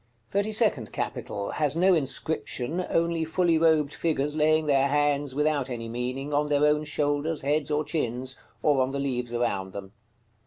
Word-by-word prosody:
THIRTY 200 +2 0
SECOND 210 - +2
CAPITAL. 100 0 -4
Has 150 -1 +1
no 185 +3 +4
inscription, 155 +1 -1
only 165 -1 +1
fully 165 0 +2
robed 155 -3 +3
figures 150 -3 -1
laying 155 0 +3
their 140 -2 +3
hands, 145 -1 +1
without 150 -2 +1
any 115 -2 -5
meaning, 125 +5 -4
on 150 +1 +2
their 145 0 +3
own 150 0 +2
shoulders, 150 +1 -1
heads, 145 +1 0
or 150 0 +1
chins, 130 -4 -2 0.3
or 145 -3 +3
on 130 - +1
the 140 +1 -3
leaves 125 -3 -2
around 100 -6 -1
them. 95 -1 -8
145 Hz, 165 wpm, -26 LUFS, 130-155 Hz, 0.3 s, no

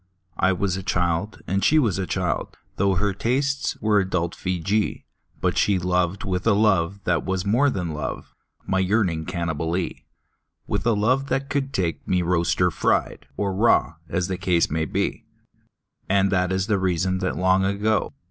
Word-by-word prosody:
I 95 - +4
was 95 0 0
a - - -4
child, 90 +1 -1
and 100 +1 -1
she 155 - +4
was 110 - +2
a 95 - -2
child - - -2
— - - -41
Tho' 100 0 +2
her 100 +2 +1
tastes 135 +7 -1
were 105 -1 +3
adult 90 -3 -1
Feejee 95 +3 -1 0.2
— - - -37
But - - +1
she 100 -2 +3
loved 90 +1 0
with 90 0 -2
a 115 - +5
love 100 -2 +2
that 85 -3 +1
was 95 0 -2
more 120 +8 +3
than 90 - -3
love, 75 0 -5 0.3
My 95 - 0
yearning 95 -5 +1
Cannibalee; 85 0 -2 0.6
With - - -2
a 115 - +4
love 125 +6 +1
that 135 0 -2
could 140 -2 -1
take 90 -8 -2
me 90 -1 +1
roast 85 -1 +1
or 90 -1 +4
fried - - 0
Or 100 -2 -1
raw, 95 - +3 0.2
as 90 0 -1
the 95 -1 -3
case 90 -5 +1
might 80 0 -1
be. - - -1 0.9
And 95 0 +3
that 90 -1 +1
is 95 0 0
the 105 -2 +1
reason 95 0 0
that 95 -1 -2
long 95 +1 +3
ago. 105 +3 0
95 Hz, 185 wpm, -23 LUFS, 90-105 Hz, 0.9 s, a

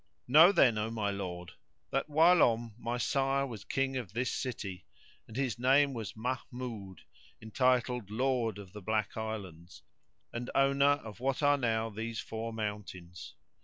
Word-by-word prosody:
Know 155 +8 +8
then, 125 - +4
O 105 +1 -1
my 110 -3 -1
lord, 90 -3 -5 0.4
that 135 +3 -1
whilome 145 -8 +4
my 120 +1 -2
sire 135 +2 +1
was 115 -7 -8
King 135 0 -1
of 110 -7 -6
this 125 +2 -1
city, 95 -9 -5 0.4
and 115 - -9
his 130 -3 -1
name 135 +3 +4
was 115 -5 -6
Mahmud, 120 - -5 0.4
entitled 125 -1 +1
Lord 120 -2 0
of 100 -2 -11
the 105 - -8
Black 110 +1 -1
Islands, 95 -6 -6 0.5
and 120 +1 -4
owner 140 +1 +4
of 110 -1 -9
what 135 +3 -1
are 145 0 +5
now 115 -2 0
these 115 +2 -4
four 115 +1 -5
mountains. 105 -5 -6
115 Hz, 150 wpm, -31 LUFS, 105-130 Hz, 0.5 s, Know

